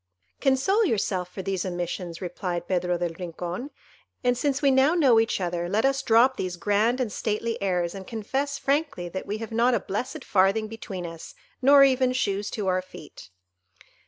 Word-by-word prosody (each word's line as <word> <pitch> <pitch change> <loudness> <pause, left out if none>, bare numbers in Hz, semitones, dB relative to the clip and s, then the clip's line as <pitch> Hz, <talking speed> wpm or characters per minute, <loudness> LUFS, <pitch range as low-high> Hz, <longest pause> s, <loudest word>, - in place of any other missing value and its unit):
"Console 275 - +2
yourself 195 - -1
for 190 - -6
these 190 -1 -2
omissions," 175 -1 -4
replied 175 -1 -4
Pedro 180 -1 0
del 175 -1 -2
Rincon; 180 - -5 0.5
"and 245 0 +3
since 275 +2 0
we 280 -2 +3
now 265 +5 +4
know 265 -9 +5
each 225 -2 0
other, 175 -1 -2
let 215 +6 +1
us 270 0 +2
drop 235 +4 +4
these 180 -1 -3
grand 210 +7 +1
and 245 -5 -1
stately 225 +2 -2
airs, 180 -3 0
and 190 -1 -9
confess 270 +6 -2
frankly 280 - -1
that 190 +2 -6
we 210 - -2
have 225 0 -7
not 235 +2 +3
a - - +1
blessed 255 - -5
farthing 200 +3 +2
between 200 -5 -7
us, 165 -1 -9 0.3
nor 275 +1 +7
even 260 -2 +3
shoes 205 -4 -1
to 210 - -4
our 185 -1 +1
feet." 155 - -13
210 Hz, 180 wpm, -26 LUFS, 180-260 Hz, 0.5 s, nor